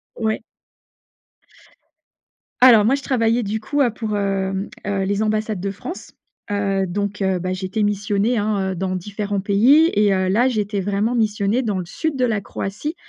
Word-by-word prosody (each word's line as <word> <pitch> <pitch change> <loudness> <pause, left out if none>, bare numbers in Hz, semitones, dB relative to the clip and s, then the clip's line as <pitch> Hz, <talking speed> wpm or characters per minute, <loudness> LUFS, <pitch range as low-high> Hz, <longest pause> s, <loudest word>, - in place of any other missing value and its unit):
Ouais. 220 -1 -1 2.2
Alors, 230 -5 +8
moi 265 +4 +4
je 280 - -6
travaillais 235 -2 +1
du 215 +2 -2
coup, 285 +6 -1
heu, 245 -4 +3
pour, 215 -2 -3
hem, 195 0 -1 0.2
heu, 195 -1 0
les 200 +2 -1
ambassades 215 -2 -1
de 195 +1 -3
France. 335 - -8 0.4
Heu, 195 -1 0
donc, 205 +2 -3
heu, 190 -1 +1
bah 185 +1 -3
j'étais 190 +3 -2
missionnée, 205 +3 0
hein, 205 -2 0
heu, - - -4
dans 185 +1 -2
différents 200 +1 -3
pays 250 - +4
et 205 -1 +3
heu, 185 0 0
là, 235 +6 +3
j'étais 210 -4 -1
vraiment 205 +5 0
missionnée 210 +1 +1
dans 205 -4 -1
le 180 - -4
sud 310 - -3
de 255 -1 +1
la 220 -4 0
Croatie, 210 - -5
205 Hz, 175 wpm, -21 LUFS, 195-225 Hz, 2.2 s, Alors